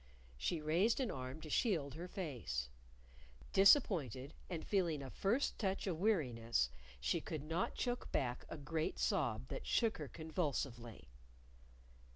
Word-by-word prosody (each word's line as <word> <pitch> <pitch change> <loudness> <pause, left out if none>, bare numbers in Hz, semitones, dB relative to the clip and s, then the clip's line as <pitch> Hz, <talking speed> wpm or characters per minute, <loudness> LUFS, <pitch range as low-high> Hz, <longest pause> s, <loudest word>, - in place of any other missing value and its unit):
She 155 - -1
raised 175 - +3
an 255 -4 0
arm 130 +4 -5
to 155 - -8
shield 160 - +1
her 170 +4 -6
face. 125 - -3 0.8
Disappointed, 165 - +5 0.2
and 165 -3 -4
feeling 170 -8 +1
a 130 - -7
first 230 +8 +1
touch 195 -2 0
of 175 -5 -1
weariness, 120 - +2 0.3
she 65 +2 +1
could 155 -3 -4
not 165 +4 -1
choke 245 -1 -2
back 125 -2 0
a - - -5
great 155 - -2
sob 110 - 0
that - - -5
shook 225 -5 +2
her 150 - -4
convulsively. 135 - -3
155 Hz, 140 wpm, -38 LUFS, 130-190 Hz, 0.8 s, Disappointed